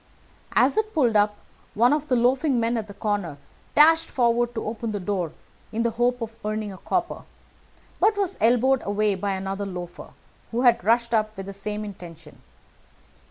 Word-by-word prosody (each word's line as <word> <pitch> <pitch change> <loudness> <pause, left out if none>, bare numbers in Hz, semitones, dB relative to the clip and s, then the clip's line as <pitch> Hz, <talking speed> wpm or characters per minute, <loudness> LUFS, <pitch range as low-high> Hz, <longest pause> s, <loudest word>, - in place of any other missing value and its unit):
As - - +4
it 435 -2 -3
pulled 245 -8 +2
up 210 0 +3 0.4
one 240 +6 +4
of 300 0 -1
the 255 - +2
loafing 255 +3 +2
men 230 +1 0
at 220 -2 -3
the 200 - -10
corner 205 -8 -2 0.4
dashed 320 +2 +6
forward 240 -1 +1
to 225 - -3
open 220 0 -4
the 205 - -2
door 180 -4 -2 0.4
in 225 +1 -1
the 235 - +1
hope 245 +2 0
of 225 0 -7
earning 215 -1 -3
a 185 - -12
copper, 350 - -2 0.8
but 425 -1 +3
was 395 -3 0
elbowed 245 +3 +3
away 205 +1 +1
by 195 +1 -2
another 195 +1 -4
loafer 175 -2 -8 0.4
who 235 +1 -1
had 240 -6 +4
rushed 235 +3 +2
up 215 -1 0
with 195 - -6
the 195 - -7
same 210 +2 -4
intention. 170 -6 -11
220 Hz, 180 wpm, -24 LUFS, 200-245 Hz, 0.8 s, dashed